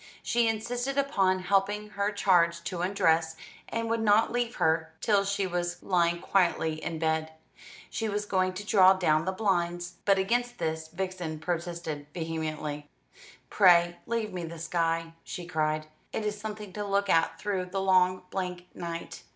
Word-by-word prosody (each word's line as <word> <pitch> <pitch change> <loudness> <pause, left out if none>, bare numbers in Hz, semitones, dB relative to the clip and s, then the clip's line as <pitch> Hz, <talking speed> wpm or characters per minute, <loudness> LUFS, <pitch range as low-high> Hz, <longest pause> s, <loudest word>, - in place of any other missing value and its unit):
She 235 -1 +2
insisted 245 +5 -2
upon 195 -10 +2
helping 200 +2 +1
her 205 0 -1
charge 170 -4 +3
to 175 -1 -4
undress, 165 -4 +2 0.3
and 230 0 -2
would 230 0 0
not 215 +1 +4
leave 240 -1 -1
her 160 0 +1
till 205 0 +3
she 200 0 0
was 175 -1 -3
lying 170 -2 +2
quietly 170 -4 +1
in 165 - -3
bed. 160 0 -1 0.6
She 225 -1 -2
was 205 0 -2
going 185 -2 +1
to 205 +2 -6
draw 190 -3 +6
down 160 -4 +2
the 190 - 0
blinds, 175 -3 -1
but 195 -1 +4
against 240 +5 0
this 160 0 -2
Vixen 175 -2 -4
protested 165 -2 -4
vehemently. 155 -3 -4 0.6
"Pray 175 -3 +5
leave 230 -3 -2
me 180 -1 -4
the 165 0 -7
sky," 165 0 -1
she 175 - -6
cried; 155 -2 -1 0.3
"it 220 - -3
is 210 0 -1
something 210 -2 -7
to 210 - -3
look 200 0 0
at 165 -3 +2
through 195 -3 -1
the 185 +2 -3
long 185 -1 +3
blank 180 -2 -4
night. 170 -1 -6
185 Hz, 160 wpm, -28 LUFS, 165-205 Hz, 0.6 s, draw